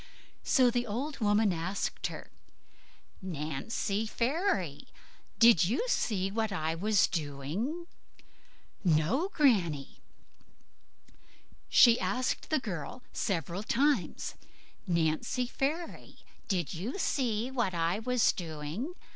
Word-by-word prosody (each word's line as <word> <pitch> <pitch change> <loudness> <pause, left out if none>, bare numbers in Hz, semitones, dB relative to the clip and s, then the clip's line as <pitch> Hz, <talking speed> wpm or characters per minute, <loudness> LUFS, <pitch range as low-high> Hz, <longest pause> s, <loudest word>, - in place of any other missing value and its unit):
So 250 -2 +4
the 245 0 -1
old 270 +8 -3
woman 210 -2 +3
asked 175 +4 -2
her, - - -9 0.9
"Nancy 185 +6 -2
Fairy, 305 - -1 0.5
did 230 -7 +7
you 250 - 0
see 195 - 0
what 220 0 -1
I 160 -4 -1
was 200 +4 +3
doing?" 165 - -3 1.0
"No, 180 - +2
Granny." 185 - +1 1.7
She 235 -1 +7
asked 255 0 -1
the 310 - +3
girl 210 - -6
several 175 - -2
times, 265 0 0 0.5
"Nancy 170 +8 0
Fairy, 300 +7 -3 0.3
did 180 -5 -1
you 200 - -4
see 245 - 0
what 235 -9 -1
I 170 +4 0
was 250 0 +3
doing?" 165 - -5
210 Hz, 100 wpm, -30 LUFS, 170-250 Hz, 1.7 s, did